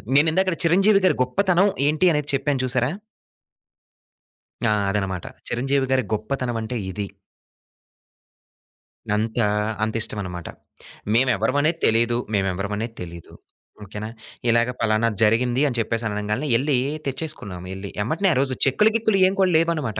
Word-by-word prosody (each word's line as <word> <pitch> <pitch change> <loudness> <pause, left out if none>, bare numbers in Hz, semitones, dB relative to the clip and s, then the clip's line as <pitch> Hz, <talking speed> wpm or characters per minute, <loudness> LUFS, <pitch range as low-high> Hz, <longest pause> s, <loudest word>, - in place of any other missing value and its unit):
నేను 145 +3 +5
ఇందాకట 185 +1 +1
చిరంజీవి 195 +5 +4
గారి - - +4
గొప్పతనం 185 +8 +2 0.2
ఏంటి 155 +4 +2
అనేది 150 -1 -1
చెప్పాను 140 0 0
చూశారా? 130 0 +1 1.7
ఆ! - - +3 0.2
అదనమాట. 95 -3 -2 0.2
చిరంజీవి 135 +2 0
గారి 130 -1 +3
గొప్పతనమంటే 115 +1 -3 0.2
ఇది. 100 +1 -4 2.1
అంత 110 +3 -1 0.4
అంత 110 - -1
ఇష్టమనమాట. 90 -6 -4 0.7
మేమెవ్వరం 125 +1 +2
అనేది 160 +2 +1
తెలిదు, 115 +1 +3 0.2
మేమెవ్వరం 100 0 -1
అనేది 115 +1 -4
తెలిదు 85 -1 -9 0.5
ఓకే 105 +1 -10
నా. - - -3 0.4
ఇలాగ 115 +1 +3
పలానా 110 +1 +2
జరిగింది 120 +4 +3
అని 125 -3 -3
చెప్పేసి 115 +1 -1
అనంగాల్నే 105 +7 -2
ఎళ్లి 140 +1 +1 0.3
తెచ్చేసుకున్నాం 135 - -5
ఎళ్లి 95 +1 -7
ఎమ్మటనే 160 - +1
ఆ - - -2
రోజు 135 -1 +1
చెక్కులు, 140 +11 +4
గిక్కులు 220 -3 +2
ఏం 190 - 0
కూడా 190 -1 +4
లేవనమాట. 160 -9 0
125 Hz, 130 wpm, -23 LUFS, 105-150 Hz, 2.1 s, నేను